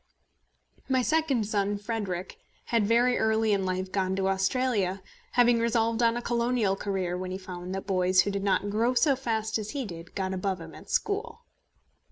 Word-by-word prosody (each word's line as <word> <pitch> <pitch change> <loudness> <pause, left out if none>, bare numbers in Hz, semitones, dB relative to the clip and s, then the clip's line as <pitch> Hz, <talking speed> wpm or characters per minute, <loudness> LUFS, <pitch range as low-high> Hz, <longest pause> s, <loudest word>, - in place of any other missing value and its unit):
My 260 -1 +2
second 295 -7 +1
son, 205 -1 0
Frederic, 200 -4 -4 0.3
had 230 -4 +1
very 240 +2 +3
early 220 -1 +2
in 195 -2 0
life 185 0 -2
gone 190 -1 0
out - - -2
to 190 0 +1
Australia, 195 -1 0 0.3
having 245 -1 +5
resolved 230 0 +1
on 230 0 +3
a 240 - -4
colonial 235 -4 +1
career 190 -3 -2
when 185 0 -4
he 185 - -3
found 185 -1 -7
that 195 - -5
boys 185 -1 +3
who 200 - -1
did 200 0 -3
not 200 0 +1
grow 230 +4 +1
so 280 +1 +4
fast 225 -4 -1
as 215 -1 -5
he 275 0 -3
did 170 -3 -9
got 190 -1 -2
above 190 0 -2
him 165 -1 -10
at - - -13
school. 455 +3 -2
205 Hz, 190 wpm, -28 LUFS, 190-235 Hz, 0.3 s, having